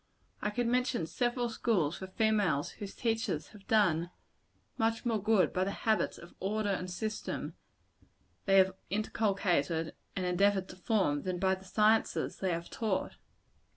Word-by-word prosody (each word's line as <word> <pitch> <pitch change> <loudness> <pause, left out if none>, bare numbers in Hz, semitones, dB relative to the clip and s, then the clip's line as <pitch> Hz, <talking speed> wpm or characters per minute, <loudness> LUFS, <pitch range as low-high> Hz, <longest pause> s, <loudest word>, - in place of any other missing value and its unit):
I 210 - 0
could 240 +3 -1
mention 250 -5 +1
several 240 +7 0
schools 200 -9 0
for 190 - -7
females, 195 -8 +1
whose 200 -2 -8
teachers 225 -9 -1
have 205 -2 -16
done 175 -6 +3 0.7
much 225 +1 0
more 225 -3 +1
good 210 -2 +3
by 185 - +1
the 190 - -1 0.2
habits 220 -1 +2
of 170 - -13
order 205 +2 0
and 185 -1 -2
system 215 +4 -4 0.9
they 195 -1 +5
have 190 0 +5 0.2
inculcated 195 -7 0 0.2
and 185 - -1
endeavored 190 +1 +2
to - - -9
form, 185 -7 +1
than 185 -1 -2
by 190 +1 +2
the 190 0 -6
sciences 215 +4 +2
they 190 -2 -1
have 170 0 -4
taught. 215 -4 -2
195 Hz, 155 wpm, -32 LUFS, 180-220 Hz, 0.9 s, they